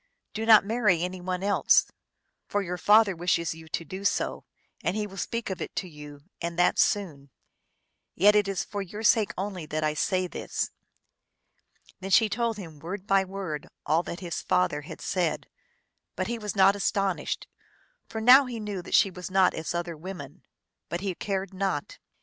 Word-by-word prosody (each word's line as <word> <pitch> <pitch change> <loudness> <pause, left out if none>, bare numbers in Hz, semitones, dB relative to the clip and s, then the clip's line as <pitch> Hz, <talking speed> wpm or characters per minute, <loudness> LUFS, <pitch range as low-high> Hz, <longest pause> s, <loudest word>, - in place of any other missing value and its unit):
Do 225 +1 -3
not 220 -3 +8
marry 210 -6 +2
any 180 0 -4
one 185 +1 -3
else. 200 0 +4 0.6
For 205 0 -1
your 180 -1 -4
father 210 0 +5
wishes 170 -1 0
you 160 0 -13
to 165 - -4
do 190 +5 -7
so, 200 - -1 0.4
and 180 - 0
he 215 -1 -1
will 195 -2 -10
speak 230 +3 -3
of 190 - -5
it - - -6
to 185 - -2
you, 150 -3 -11 0.2
and 170 0 -4
that 175 - +3
soon. 165 - 0 0.9
Yet 205 +4 +5
it 205 -1 +3
is 195 -2 -1
for 205 -1 -5
your 205 +3 -7
sake 215 -1 +4
only 185 -4 -4
that 155 +1 -2
I 155 0 +1
say 185 +4 0
this." 180 - -3 1.3
Then 190 +1 -6
she 220 +2 +5
told 230 +1 -1
him 165 -7 -9
word 185 +5 -6
by 195 -1 +3
word 190 -5 -5 0.2
all 155 +3 +3
that 175 +1 -7
his 175 -2 -4
father 150 -5 +1
had 145 - -10
said; 180 -4 -1 0.7
but - - -1
he 235 0 -3
was 210 -2 -4
not 195 0 +5
astonished, 195 -2 -1 0.6
for 220 - -4
now 255 +4 +7
he 240 -2 -5
knew 205 -3 -4
that - - -1
she 195 - +5
was 180 0 -7
not 190 -1 +4
as 160 +2 -4
other 170 -1 -3
women; 155 -4 -9 0.5
but 170 - -3
he 195 -2 -2
cared 195 +1 -3
not. 190 -6 -3
190 Hz, 185 wpm, -27 LUFS, 170-205 Hz, 1.3 s, not